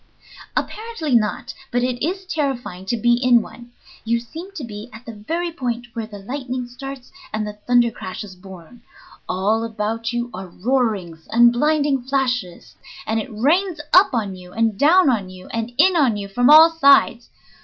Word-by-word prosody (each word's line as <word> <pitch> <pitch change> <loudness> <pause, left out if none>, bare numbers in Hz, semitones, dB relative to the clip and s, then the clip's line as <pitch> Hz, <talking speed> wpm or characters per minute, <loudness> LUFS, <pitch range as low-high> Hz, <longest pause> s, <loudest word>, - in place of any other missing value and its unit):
"Apparently 430 - -3
not, 215 -3 0 0.2
but 245 0 0
it 250 0 -2
is 375 +4 -2
terrifying 265 - -3
to 235 - 0
be 240 +2 +3
in 245 0 +4
one. 240 +2 -11 0.3
You 235 +1 0
seem 325 +11 -10
to 330 -8 -7
be 215 0 -8
at 220 +3 -13
the 230 - -8
very 330 +12 -3
point 245 -6 -4
where 225 -2 -5
the 210 -2 -10
lightning 250 +3 -5
starts 265 +1 -9 0.2
and 215 0 -2
the 210 - -6
thunder 240 -1 +4
crash 185 -2 -7
is 195 -3 -11
born. 190 +4 -13 0.5
All 210 +5 0
about 225 +1 -3
you 240 0 -3
are 190 +1 -7
roarings 195 -6 -2
and 240 +1 +5
blinding 290 0 +1
flashes, 250 -8 -2 0.3
and 220 +1 0
it 215 - -5
rains 325 - +1
up 370 +2 +7
on 210 -6 -2
you 180 -1 -13
and 225 -2 +1
down 315 - +5
on 215 -8 +1
you, 185 0 -12
and 230 +1 -4
in 365 +5 +5
on 265 -10 +3
you 200 -1 -5
from 245 +6 +2
all 315 +2 +9
sides. 275 -6 +4
240 Hz, 180 wpm, -21 LUFS, 215-275 Hz, 0.5 s, all